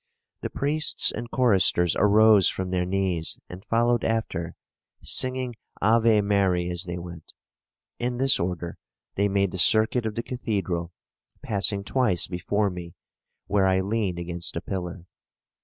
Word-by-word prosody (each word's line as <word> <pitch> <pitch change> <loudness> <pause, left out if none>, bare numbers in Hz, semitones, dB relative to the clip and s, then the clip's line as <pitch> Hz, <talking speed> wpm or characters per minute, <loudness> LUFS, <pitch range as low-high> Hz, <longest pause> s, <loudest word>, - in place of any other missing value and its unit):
The - - -3
priests 150 +2 +1
and 120 +2 -6
choristers 95 -9 +2
arose 105 -1 +5
from 95 -1 -4
their 90 -1 0
knees 95 -3 -1
and 90 +2 -10
followed 120 +2 +1
after, 90 -7 -2 0.5
singing 130 -1 +1 0.3
'Ave 110 0 +4
Mary' 95 -3 +1
as 90 +2 -4
they 85 0 -5
went. 85 -2 -10 0.7
In 120 0 -2
this 135 +1 +3
order 85 -1 -4 0.3
they 100 +1 +1
made 100 -1 0
the 95 - -5
circuit 110 +4 +3
of 105 - -5
the 115 - -3
cathedral, 95 -9 -3 0.5
passing 100 -1 -1
twice 115 -6 +1
before 100 +3 -1
me 85 -2 -9 0.5
where 100 -2 +2
I 95 0 +2
leaned 100 -2 -1
against 85 0 -3
a - - -3
pillar. 90 -2 -5
100 Hz, 140 wpm, -25 LUFS, 90-115 Hz, 0.7 s, arose